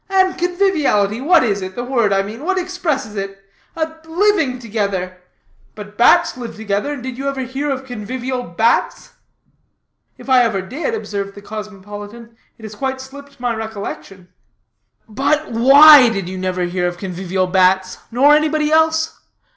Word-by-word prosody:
And 375 -1 +2
conviviality, 320 - +1
what 330 +2 +4
is 200 -4 -1
it? 185 0 -6
The 245 - -4
word, 240 -5 +1
I 195 0 +2
mean; 220 +7 -8
what 380 +3 0
expresses 345 - -3
it? 195 0 -5 0.4
A 320 0 -3
living 330 -6 +1
together. 200 -6 -3 0.5
But 210 -1 -10
bats 340 +10 +4
live 245 -2 -7
together, 215 +6 -2
and 265 -4 -8
did 260 -1 -6
you 275 0 -1
ever 275 -1 -4
hear 265 +4 -4
of 265 -1 -3
convivial 250 +2 -4
bats?" 225 +2 0 1.1
"If - - -14
I 260 -2 +5
ever 215 -6 0
did," 310 - -4
observed 200 - -5
the 205 - -12
cosmopolitan, 210 +2 -9 0.2
"it 225 - -17
has 215 -1 -8
quite 265 +4 -3
slipped 280 +1 -12
my 245 -1 -1
recollection." 205 -4 -7 0.8
"But 280 +7 -1
why 270 +3 +8
did 195 -5 -3
you 185 +1 -6
never 185 -1 -2
hear 180 0 -1
of 175 0 -5
convivial 185 0 -2
bats, 185 0 +2
nor 270 +5 +4
anybody 305 0 +1
else? 320 0 +2
240 Hz, 160 wpm, -18 LUFS, 200-290 Hz, 1.1 s, why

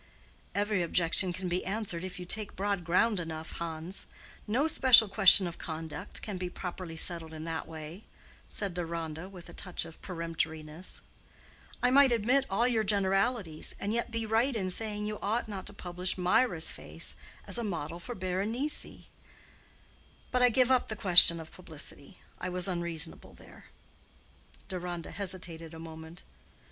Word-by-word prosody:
"Every 205 -1 +1
objection 170 +2 +2
can 185 +1 -4
be 180 +1 -1
answered 195 -4 -2
if 185 -1 -6
you 180 - -6
take 210 +3 -2
broad 200 -1 -1
ground 190 +5 +3
enough, 160 -1 -5
Hans: 170 +2 -4 0.4
no 255 +9 +2
special 255 -7 +7
question 195 -1 +7
of 170 -1 -5
conduct 160 -2 -5
can 205 -3 -4
be 180 -1 -2
properly 180 -2 -6
settled 160 -1 0
in 155 - -6
that 165 0 -3
way," 160 +4 -8 0.4
said 200 -3 +1
Deronda, 165 0 -4
with 180 -3 -11
a - - -11
touch 180 -3 -4
of 165 -1 -12
peremptoriness. 165 -1 -3 0.8
"I 250 - +5
might 275 -1 +7
admit 245 +4 +3
all 225 +5 +3
your 230 -3 +2
generalities, 195 -3 +1
and 205 +2 -1
yet 235 0 0
be 230 -1 -2
right 230 +4 +2
in 190 -4 -1
saying 210 +1 -2
you 210 0 -3
ought 220 +4 0
not 195 -3 -6
to - - -6
publish 180 +1 -3
Mirah's 180 -1 +3
face - - -4 0.3
as - - -1
a - - -1
model 170 -5 -3
for 240 +7 -6
Berenice. 205 +10 -2 1.3
But 250 - +2
I 250 - +7
give 255 +2 +4
up 255 -1 +4
the 220 - -3
question 175 -4 +7
of 160 -1 -9
publicity. 165 0 -8 0.2
I 180 - -3
was 180 +1 -1
unreasonable 170 -3 -3
there." - - -15 1.0
Deronda 175 -3 -5
hesitated 175 -4 -5
a - - -9
moment. 160 +1 -10
185 Hz, 160 wpm, -31 LUFS, 165-215 Hz, 1.3 s, special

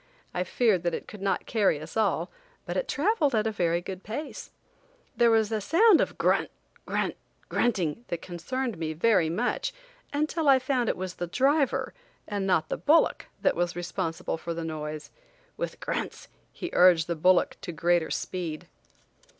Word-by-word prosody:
I 180 - 0
feared 205 -1 +2
that 175 -1 0
it - - -7
could 210 - -10
not 195 0 0
carry 205 -9 +2
us 155 +2 -10
all, 220 -2 +1 0.3
but - - -4
it - - -1
traveled 310 - +1
at 215 0 +2
a 220 - +1
very 170 -4 0
good 185 +1 -7
pace. 285 +9 -6 0.7
There 235 -1 +4
was 225 -1 +3
a 215 -1 0
sound 370 - +5
of - - -2
grunt, - - +2 0.4
grunt, - - -1 0.3
grunting 205 -4 0
that 170 - -3
concerned 225 +7 -4
me 160 -1 -2
very 175 -1 +3
much 230 +9 -1 0.4
until 305 +1 0
l 265 -1 +7
found 255 -2 0
it - - -1
was 185 0 -4
the 175 - -4
driver 275 - +1 0.3
and 200 -2 -2
not 175 -4 +2
the - - -1
bullock 315 +3 +3 0.2
that - - +3
was 175 0 -1
responsible 170 -2 -3
for 170 0 -4
the 165 0 -4
noise. 155 -1 -5 0.4
With - - -4
grunts - - -4 0.2
he 355 - -6
urged 175 -3 +6
the 170 - -2
bullock 180 +3 +3
to 175 - -5
greater 170 0 +1
speed. 165 -4 -4
190 Hz, 175 wpm, -27 LUFS, 170-245 Hz, 0.7 s, l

